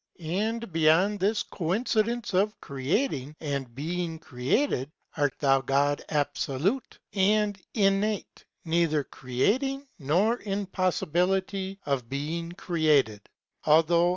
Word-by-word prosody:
And 205 +5 -2
beyond 165 +6 +4
this 205 +3 +1
Coin 185 +6 -2
cidence 230 0 0
of 205 +3 +1
creating 140 - -2
and 140 -6 -4
being 165 +3 -3
created, 135 - 0 0.3
a 145 -2 +2
t - - -28
ihmi 135 -2 +3
vo'd 145 +1 +2
abfolute 155 - -1 0.2
and 205 0 +2
inn 195 -2 +3
Ue 210 -1 0 0.4
neither 160 -3 +2
creating 260 - -1
nor 180 - +2
in 200 -3 -3
poiiibiitty 190 +1 0
of 135 -5 -1
being 160 +5 -3
created, 150 - +1 0.3
althou^. 165 +3 +4
170 Hz, 115 wpm, -27 LUFS, 145-205 Hz, 0.4 s, beyond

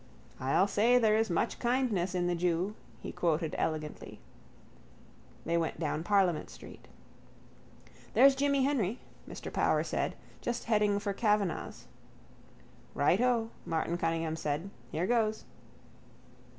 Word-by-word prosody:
—I'll 135 +8 +3
say 225 +5 +3
there 220 -3 +4
is 220 -1 +1
much 180 +6 -1
kindness 235 -8 0
in 175 -1 +1
the 175 - +1
jew, 175 +3 0 0.3
he - - -6
quoted, 165 -2 0
elegantly. 155 -1 -4 1.3
They 170 +1 +1
went 160 -2 -2
down 155 -1 -2
Parliament 185 -4 +2
street. - - -13 1.3
—There's 275 0 +7
Jimmy 280 0 +2
Henry, 245 -6 0 0.3
Mr - - -7
Power - - +2
said, - - -2 0.3
just 240 0 -3
heading 210 -3 +2
for 200 0 -2
Kavanagh's. 210 -4 -1 1.1
—Righto, 225 - +2
Martin 165 +1 -1
Cunningham 165 -1 -1
said. 160 +4 -3 0.2
Here 165 +3 -1
goes. 220 -1 +1
195 Hz, 120 wpm, -31 LUFS, 165-230 Hz, 1.3 s, There's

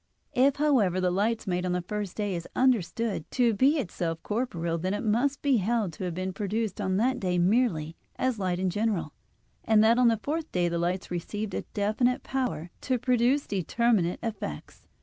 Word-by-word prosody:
If, 270 +2 +4
however, 255 -12 +2
the 180 -1 +1
light 215 +5 0
made 180 -2 -1
on 180 -1 -1
the 180 -1 -1
first 205 0 -4
day 205 -2 -1
is 170 -1 -4
understood 230 -6 +1
to 240 -3 +2
be 270 +9 +3
itself 170 - -3
corporeal, 170 -8 -2
then 185 +4 -1
it - - -4
must 245 +6 +1
be 275 -3 +4
held 215 -3 0
to 185 - -5
have 175 -2 -3
been 185 +1 -3
produced 210 +1 -2
on 190 -1 0
that 255 +5 +1
day 180 -2 0
merely 175 -5 +1 0.2
as 255 -4 -1
light 185 -2 0
in 185 0 0
general; 205 -7 -1 0.5
and 220 -1 +4
that 230 +2 +5
on 250 - +5
the 230 -1 +3
fourth 310 +8 -3
day 175 -1 +1
the 170 0 -1
lights 180 +2 -2
received 200 +4 -4
a - - -1
definite 215 +5 +1
power 250 -11 -3
to 255 - 0
produce 250 +3 +2
determinate 200 -1 +1
effects. 195 - -6
210 Hz, 190 wpm, -28 LUFS, 180-240 Hz, 0.5 s, that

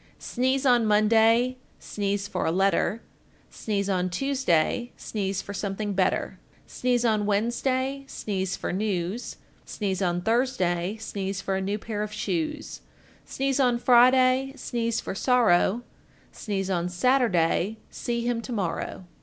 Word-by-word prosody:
Sneeze 260 +2 -1
on 245 -3 +4
Monday, 225 +4 +4 0.2
sneeze 205 0 -3
for 180 - -2
a - - +2
letter, 195 +4 +1 0.5
Sneeze 200 -2 -2
on 185 -2 0
Tuesday, 245 - 0
sneeze 195 -2 -3
for 200 - -7
something 200 +1 -3
better, 190 -1 0 0.3
Sneeze 245 -1 0
on 215 -2 +2
Wednesday, 260 +6 0
sneeze 195 -6 -3
for - - -4
news, 195 +2 -2 0.3
Sneeze 195 -3 -3
on 175 -1 0
Thursday, 210 -5 0
sneeze 195 -3 -4
for 195 -1 -2
a 190 - -1
new 200 +2 -1
pair 215 0 -4
of 210 0 -3
shoes, 305 +6 -3 0.4
Sneeze 270 0 -1
on 250 -3 +3
Friday, 255 +2 +4
sneeze 235 -3 -2
for - - -5
sorrow, 230 -1 +3 0.5
Sneeze 195 -3 -3
on 175 -1 0
Saturday, 195 -2 +2
see 235 -1 -3
him 240 -1 0
to 230 - -8
morrow. 190 -3 -3
215 Hz, 135 wpm, -26 LUFS, 195-245 Hz, 0.5 s, on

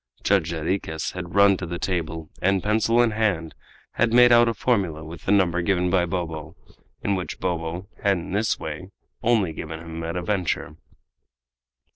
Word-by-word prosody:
Judge 95 -5 +2
Jarriquez 80 0 -2
had 90 0 -7
run 100 -1 +6
to 90 - -5
the 85 +1 -4
table, 80 -3 -3
and, 95 0 +2
pencil 110 +3 +3
in 115 - +2
hand, 100 -7 0 0.4
had 120 0 +1
made 120 +1 +7
out 120 0 +6
a - - 0
formula 95 -10 0
with 80 +1 -10
the - - +1
number 90 -4 +3
given 90 0 +1
by 90 -2 +2
Bobo, 80 -3 -4 0.5
and 100 - +1
which 90 -2 -4
Bobo 85 0 -3
had 100 -2 +2
in 85 - -7
this 105 +3 +1
way 80 +4 -6 0.3
only 110 -8 +2
given 80 +1 -6
him 80 0 -7
at 85 +1 -4
a 90 - -2
venture. 90 -4 -1
90 Hz, 175 wpm, -24 LUFS, 80-100 Hz, 0.5 s, made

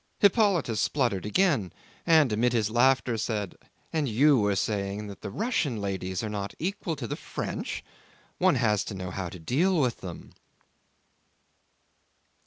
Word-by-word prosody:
Hippolyte 195 - +3
spluttered 115 -9 0
again, 125 - +2 0.4
and 155 -8 +5
amid 120 +3 +2
his 110 -3 +1
laughter 120 -1 +3
said, 105 -4 -2 0.4
"And 155 -4 0
you 135 +4 +4
were 105 -1 +2
saying 100 +1 -2
that 100 -1 -9
the - - -5
Russian 150 - -1
ladies 95 -2 -3
are - - -2
not 100 -1 -4
equal 180 -2 -3
to 135 -4 -5
the - - -3
French? - - -5 0.6
One - - +4
has 105 -1 +2
to 105 - -5
know 90 -1 -5
how 90 -1 -4
to 90 - -9
deal 160 - +1
with 125 -5 +1
them." 90 -3 -8
115 Hz, 150 wpm, -27 LUFS, 100-150 Hz, 0.6 s, and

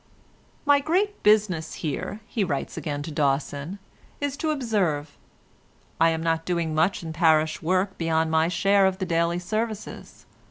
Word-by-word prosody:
"My 285 -1 +5
great 380 +8 0
business 205 -7 +2
here," 165 +7 -4
he 220 -2 -1
writes 145 -7 -3
again 145 -2 -4
to 160 - -6
Dawson, 145 +4 -1 0.4
"is 285 -1 -2
to 315 +1 -1
observe. 195 - -1 0.8
I 165 +1 +5
am 160 0 -2
not 165 -1 0
doing 170 -2 -1
much 165 +4 +1
in 160 -1 -5
parish 160 -2 +3
work 185 +4 0
beyond 160 -1 +1
my 160 0 +3
share 195 +3 +3
of 190 -1 -1
the 190 - -2
daily 170 0 +1
services. 215 +4 -5
170 Hz, 155 wpm, -25 LUFS, 160-205 Hz, 0.8 s, My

